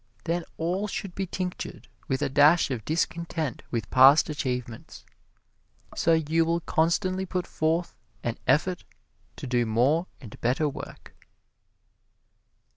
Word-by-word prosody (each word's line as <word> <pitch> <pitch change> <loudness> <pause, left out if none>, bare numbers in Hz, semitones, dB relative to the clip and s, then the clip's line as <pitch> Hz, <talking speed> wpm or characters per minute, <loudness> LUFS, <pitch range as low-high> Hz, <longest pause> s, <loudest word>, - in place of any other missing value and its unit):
Then 170 0 -2
all 180 +5 -1
should 195 -2 -5
be 195 +1 -3
tinctured 180 0 -5 0.2
with 135 +1 -1
a - - +2
dash 145 +3 +5
of 120 -4 -3
discontent 165 -3 -2
with 115 -6 -4
past 135 +4 +7
achievements, 125 -5 -5 0.9
so 165 - +3
you 160 +1 +2
will 170 +1 0
constantly 185 +4 0
put 180 0 -2
forth 165 +2 -1 0.3
an 120 -1 -3
effort 170 +7 +2 0.5
to - - -8
do 125 -1 +1
more 135 +11 +2
and 115 -6 -12
better 130 +6 +1
work. 145 - -8
160 Hz, 125 wpm, -26 LUFS, 130-170 Hz, 0.9 s, past